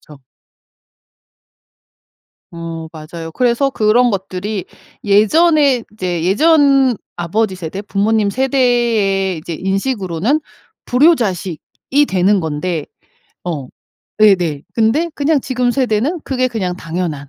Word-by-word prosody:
그쵸. 145 -3 -16 2.3
어 165 -1 -6
맞아요. 165 +1 -8
그래서 250 - +1
그런 240 +1 +3
것들이 195 0 -4 0.4
예전에 270 +6 +3
이제 180 -5 -3
예전 275 - +4 0.2
아버지 190 +4 -1
세대, 180 +3 -6
부모님 205 +1 +1
세대의 235 -7 +1
이제 165 +2 -6
인식으로는 195 - -1 0.4
불효자식이 250 - +1
되는 190 +2 +2
건데 160 0 -3 0.6
어 150 -7 -4 0.5
네네 180 -9 +3
근데 235 +10 +2
그냥 290 0 +1
지금 250 -1 -1
세대는 255 +6 0
그게 255 -1 0
그냥 185 -7 -3
당연한 165 -5 -4
205 Hz, 235 characters per minute, -16 LUFS, 175-255 Hz, 2.3 s, 예전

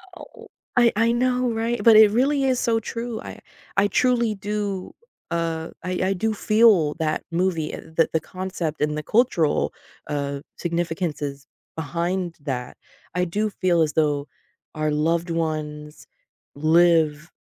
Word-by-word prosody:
Oh, 455 +5 -13 0.3
I 240 -1 +6
I 230 +2 +3
know, 250 0 +1
right? 230 +1 -1
But 230 -2 +7
it 215 -1 +8
really 275 +4 +2
is 260 -2 +2
so 225 -1 +1
true. 230 +1 -5
I - - -9 0.4
I 195 +1 +4
truly 235 0 +2
do, 200 -1 -4 0.4
uh, 165 -1 -2
I 185 - -3 0.2
I - - +2
do 220 +4 -1
feel 215 -9 +4
that 155 -1 -1
movie, 170 -2 0
uh, - - -6 0.2
the 165 - +5
the 160 - +3
concept 180 -4 -5
and 150 0 +1
the - - -2
cultural, 210 - +2 0.3
uh, 140 -1 -3 0.2
significances 165 -5 -3 0.3
behind 170 +2 -2
that. 125 -4 -4 0.4
I 180 0 +1
do 210 +5 -1
feel 180 -4 +1
as 155 -2 +1
though 145 -2 +1 0.5
our 155 0 0
loved 165 +3 0
ones 155 -2 -4 0.5
live 160 0 +3
175 Hz, 145 wpm, -23 LUFS, 155-220 Hz, 0.5 s, it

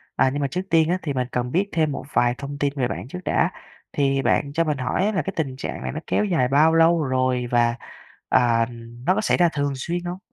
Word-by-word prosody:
À 130 - +3
nhưng 145 - -2
mà 140 - +1
trước 180 +7 -3
tiên 165 -1 +3
á, 180 - +2
thì 145 -3 -3
mình 125 -1 -1
cần 125 0 -2
biết 200 +4 +1
thêm 155 -3 +1
một - - -5
vài 120 0 +2
thông 140 +1 -6
tin 145 -1 0
về 130 -4 0
bạn - - -5
trước 180 +7 -7
đã, - - +2 0.4
thì 135 -1 +1
bạn 140 +1 +1
cho 165 - +2
mình 150 -3 -1
hỏi 130 +8 0
á 215 - +1
là 195 - 0
cái 195 - -5
tình 140 -5 -2
trạng - - -5
này - - -3
nó 155 - -4
kéo 210 - +1
dài 165 -11 +1
bao 150 +5 +4
lâu 165 0 +4
rồi 130 -2 0
và, 120 -1 +3 0.5
à, 115 -2 +3 0.4
nó 185 - +4
có 215 - 0
xảy - - +2
ra 175 -1 +4
thường 145 -1 -1
xuyên 175 +6 -3
hông? 175 +1 -4
145 Hz, 260 wpm, -23 LUFS, 130-170 Hz, 0.5 s, bao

